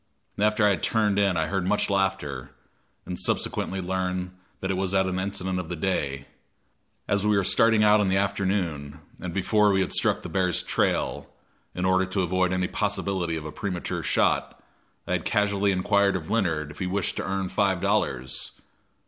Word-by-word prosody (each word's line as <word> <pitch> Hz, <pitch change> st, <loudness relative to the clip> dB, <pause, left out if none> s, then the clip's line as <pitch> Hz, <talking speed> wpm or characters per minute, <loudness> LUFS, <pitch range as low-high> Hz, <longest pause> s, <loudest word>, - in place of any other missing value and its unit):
After 105 Hz, +1 st, +3 dB
I 105 Hz, -, +5 dB
had 90 Hz, -, -1 dB
turned 105 Hz, -3 st, +1 dB
in 100 Hz, -3 st, +2 dB
I 80 Hz, -, +1 dB
heard 95 Hz, +2 st, -2 dB
much 105 Hz, -, +1 dB
laughter, 95 Hz, -10 st, -1 dB, 0.6 s
and 90 Hz, -1 st, -5 dB
subsequently 95 Hz, -, -1 dB
learned 90 Hz, 0 st, -2 dB, 0.3 s
that 95 Hz, -, -2 dB
it -, -, 0 dB
was 95 Hz, +1 st, -1 dB
at 95 Hz, 0 st, +3 dB
an 95 Hz, 0 st, -2 dB
incident 95 Hz, -1 st, -2 dB
of 85 Hz, -3 st, -6 dB
the 90 Hz, -, -3 dB
day. 70 Hz, -6 st, -2 dB, 0.8 s
As 100 Hz, -1 st, +1 dB
we 105 Hz, -1 st, +3 dB
were 100 Hz, -, +2 dB
starting 115 Hz, +2 st, +4 dB
out 105 Hz, 0 st, +5 dB
in 100 Hz, -, +1 dB
the 95 Hz, -, +2 dB
afternoon, 95 Hz, -7 st, -1 dB, 0.2 s
and 90 Hz, -, -5 dB
before 105 Hz, +3 st, +3 dB
we 95 Hz, -1 st, +2 dB
had -, -, -1 dB
struck -, -, +1 dB
the -, -, -5 dB
bear's 90 Hz, -2 st, 0 dB
trail, -, -, -1 dB, 0.5 s
in 90 Hz, -, -1 dB
order 95 Hz, 0 st, +3 dB
to 95 Hz, 0 st, 0 dB
avoid 90 Hz, +1 st, +1 dB
any 90 Hz, 0 st, 0 dB
possibility 95 Hz, -5 st, -1 dB
of 80 Hz, -, -7 dB
a 75 Hz, -, -5 dB
premature 90 Hz, -2 st, -3 dB
shot -, -, 0 dB, 0.4 s
I -, -, -6 dB
had -, -, 0 dB
casually 100 Hz, -1 st, +1 dB
inquired 100 Hz, +1 st, +2 dB
of 80 Hz, -4 st, -5 dB
Leonard 80 Hz, -9 st, 0 dB
if 75 Hz, -, -13 dB
he 95 Hz, -, -2 dB
wished 95 Hz, 0 st, -1 dB
to -, -, -1 dB
earn 95 Hz, -1 st, -2 dB
five 100 Hz, -3 st, +1 dB
dollars. 65 Hz, -5 st, -1 dB
95 Hz, 190 wpm, -26 LUFS, 90-100 Hz, 0.8 s, I